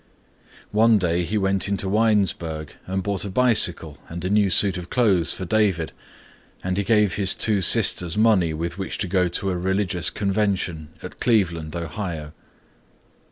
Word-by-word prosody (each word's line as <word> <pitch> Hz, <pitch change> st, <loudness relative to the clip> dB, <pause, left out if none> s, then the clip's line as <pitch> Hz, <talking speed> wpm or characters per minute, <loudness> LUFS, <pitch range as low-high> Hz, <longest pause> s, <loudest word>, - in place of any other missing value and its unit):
One 110 Hz, +1 st, +4 dB
day 90 Hz, -2 st, 0 dB
he 105 Hz, +6 st, -2 dB
went 95 Hz, -1 st, +1 dB
into 100 Hz, -1 st, -2 dB
Winesburg 95 Hz, -8 st, 0 dB
and 95 Hz, 0 st, -2 dB
bought 100 Hz, -1 st, -2 dB
a 100 Hz, -, -5 dB
bicycle 95 Hz, -, 0 dB
and 85 Hz, +1 st, -6 dB
a 95 Hz, -, -1 dB
new 105 Hz, -1 st, +3 dB
suit 95 Hz, +2 st, +4 dB
of 90 Hz, -1 st, -7 dB
clothes 100 Hz, -9 st, +2 dB
for 95 Hz, -, -5 dB
David 95 Hz, -6 st, 0 dB, 0.7 s
and 90 Hz, 0 st, -2 dB
he 100 Hz, -, 0 dB
gave 105 Hz, -2 st, +2 dB
his 95 Hz, -2 st, +2 dB
two 105 Hz, -3 st, +1 dB
sisters 90 Hz, 0 st, +3 dB
money 105 Hz, -7 st, +3 dB
with 85 Hz, +3 st, -5 dB
which 95 Hz, -, -4 dB
to 100 Hz, -, -2 dB
go 90 Hz, 0 st, +1 dB
to 95 Hz, +2 st, -2 dB
a -, -, -2 dB
religious 95 Hz, -1 st, -1 dB
convention 95 Hz, -6 st, -2 dB
at -, -, -9 dB
Cleveland, 85 Hz, -9 st, 0 dB
Ohio. 80 Hz, -2 st, -5 dB
95 Hz, 160 wpm, -23 LUFS, 85-105 Hz, 0.7 s, One